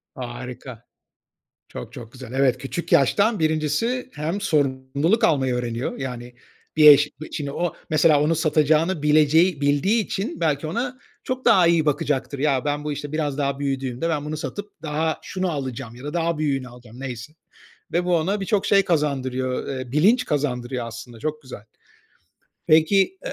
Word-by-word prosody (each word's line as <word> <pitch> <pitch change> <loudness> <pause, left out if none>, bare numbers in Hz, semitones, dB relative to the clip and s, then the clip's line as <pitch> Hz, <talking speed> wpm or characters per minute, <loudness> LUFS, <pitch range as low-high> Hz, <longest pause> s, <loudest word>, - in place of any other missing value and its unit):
Harika. 125 -1 -8 0.9
Çok, 60 - -8
çok, 115 -1 -10
güzel. 130 -2 -10
Evet, 130 -2 +2
küçük 140 +6 -5
yaştan 200 - +3
1'incisi 155 +1 0 0.3
hem 165 +7 -3
sorumluluk 140 - +1
almayı 130 -5 +2
öğreniyor. 120 0 -3
Yani 125 -2 -6 0.4
bir 150 -1 +9
eş 145 +1 +6 0.2
şimdi 140 -3 -4
o 175 +1 -2 0.2
mesela 155 -1 +4
onu 160 +2 +2
satacağını 155 +1 +2
bileceği 155 +2 +4
bildiği 150 +11 +2
için 195 -3 -4
belki 155 -1 0
ona 245 +9 -3 0.3
çok 255 0 -4
daha 190 -7 +5
iyi 165 -2 +3
bakacaktır. 140 -1 -1
Ya 140 -2 +1
ben 145 0 -2
bu 150 - -2
işte 145 +1 -6
biraz 150 -2 -2
daha 140 -1 -1
büyüdüğümde 135 +1 -2
ben 150 -3 -1
bunu 155 +1 -4
satıp 205 +1 -7
daha 155 +1 -1
şunu 185 -1 -3
alacağım 130 -5 -5
ya 125 +3 -12
da 150 +3 -5
daha 170 -2 0
büyüğünü 135 -4 -1
alacağım 120 0 -14
neyse. 125 +1 -7 0.6
Ve 175 +1 +1
bu 180 -1 +2
ona 195 +6 0
birçok 195 +1 0
şey 195 -1 +4
kazandırıyor, 130 -6 -1
ııı, 130 -2 -5
bilinç 210 - +4
kazandırıyor 125 -4 -2
aslında 115 0 -9
çok 155 +2 -4
güzel. 125 -6 -10 1.0
Peki, 190 - +3
150 Hz, 155 wpm, -23 LUFS, 130-165 Hz, 1.0 s, bir